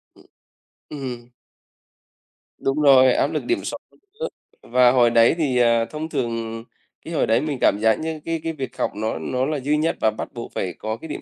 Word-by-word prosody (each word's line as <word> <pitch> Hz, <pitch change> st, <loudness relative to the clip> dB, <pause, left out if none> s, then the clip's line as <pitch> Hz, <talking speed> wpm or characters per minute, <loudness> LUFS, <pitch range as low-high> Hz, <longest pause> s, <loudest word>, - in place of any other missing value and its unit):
Ừm, -, -, -19 dB, 0.7 s
ừm. 125 Hz, -5 st, -6 dB, 1.3 s
Đúng 135 Hz, +3 st, -1 dB
rồi, 130 Hz, -3 st, +6 dB
áp -, -, +2 dB
lực -, -, -3 dB
điểm 355 Hz, -, 0 dB
số -, -, -4 dB, 0.4 s
nữa. 480 Hz, -, -1 dB, 0.3 s
Và 125 Hz, 0 st, +4 dB
hồi 125 Hz, -2 st, +4 dB
đấy 115 Hz, +4 st, +4 dB
thì, 140 Hz, -6 st, 0 dB
ờ, 115 Hz, -1 st, +3 dB
thông 155 Hz, +5 st, -6 dB
thường 115 Hz, -3 st, -3 dB, 0.4 s
cái -, -, -6 dB
hồi -, -, +1 dB
đấy 115 Hz, -, +3 dB
mình 150 Hz, -3 st, -2 dB
cảm 100 Hz, -, +4 dB
giác 110 Hz, 0 st, +3 dB
như 160 Hz, 0 st, -4 dB
cái 165 Hz, 0 st, -2 dB
cái 165 Hz, 0 st, -2 dB
việc 135 Hz, -3 st, -6 dB
học -, -, 0 dB
nó 110 Hz, -4 st, -2 dB
nó 125 Hz, +11 st, -1 dB
là 150 Hz, -1 st, -2 dB
duy 145 Hz, +3 st, 0 dB
nhất 160 Hz, +2 st, 0 dB
và 110 Hz, -, +3 dB
bắt 110 Hz, -, -7 dB
buộc 120 Hz, -1 st, -7 dB
phải 90 Hz, -2 st, -2 dB
có 110 Hz, +1 st, -4 dB
cái 160 Hz, -, -10 dB
điểm 150 Hz, -, -6 dB
125 Hz, 210 wpm, -22 LUFS, 115-150 Hz, 1.3 s, rồi